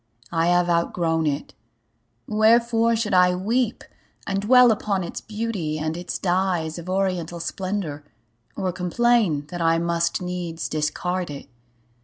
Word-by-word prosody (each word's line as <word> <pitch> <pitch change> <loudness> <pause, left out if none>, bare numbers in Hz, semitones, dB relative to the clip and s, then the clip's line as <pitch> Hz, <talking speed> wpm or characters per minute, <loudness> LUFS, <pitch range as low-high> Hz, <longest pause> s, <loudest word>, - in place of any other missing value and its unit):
I 165 0 +1
have 175 0 +3
outgrown 170 -1 +1
it. 145 0 -3 0.7
Wherefore 230 +1 +3
should 220 -3 -1
I 180 0 +5
weep 230 +5 -1 0.4
And 195 0 -1
dwell 250 +3 +6
upon 205 -3 -1
its 170 - -6
beauty, 210 -8 -3
and 155 +1 -2
its 175 0 -4
dyes 175 -3 0
Of 170 +2 -8
oriental 185 -3 -1
splendor, 185 -5 -4 0.5
or 185 -1 -1
complain 185 -3 +1
That 175 -1 -5
I 165 0 +3
must 170 0 0
needs 180 -2 -4
discard 175 +4 -2
it? 140 -1 -8
180 Hz, 135 wpm, -23 LUFS, 165-210 Hz, 0.7 s, dwell